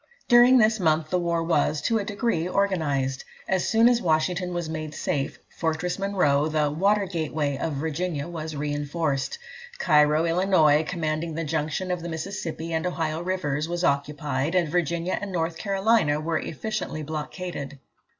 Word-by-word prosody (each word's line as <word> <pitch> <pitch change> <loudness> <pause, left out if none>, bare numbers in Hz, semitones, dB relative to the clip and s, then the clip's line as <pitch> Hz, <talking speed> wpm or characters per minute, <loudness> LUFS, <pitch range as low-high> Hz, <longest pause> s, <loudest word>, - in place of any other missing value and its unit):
During 245 +1 +7
this 220 -1 +4
month 155 -3 +1
the 180 - +2
war 170 -1 0
was, 155 -2 +1
to 225 -1 +2
a - - -2
degree, 200 -5 -1
organised. 145 -10 0 0.2
As 190 -2 +1
soon 225 +1 +5
as 240 -1 +3
Washington 180 +2 +1
was 175 -2 -3
made 155 -1 -5
safe, 140 -2 -2 0.2
Fortress 165 +3 -1
Monroe, 180 -8 +2
the 155 -2 +1
"water 200 +6 +2
gateway" 155 -5 -2
of 160 - -2
Virginia, 155 +1 -2
was 160 -2 -6
reinforced. 145 -1 -2 0.4
Cairo, 150 - +4
Illinois, 165 -4 +4
commanding 160 -2 -2
the 165 - -2
junction 160 +4 -2
of 180 -1 -2
the 170 - -5
Mississippi 165 -1 -4
and 160 +2 0
Ohio 160 -2 -2
rivers, 165 -4 -2
was 175 +1 -2
occupied, 145 +1 0
and 175 -4 +2
Virginia 170 +1 0
and 205 -1 -5
North 165 -2 -2
Carolina 195 -6 +2
were 160 +1 -1
efficiently 185 -3 -4
blockaded. 150 -1 -5
165 Hz, 155 wpm, -25 LUFS, 150-185 Hz, 0.4 s, During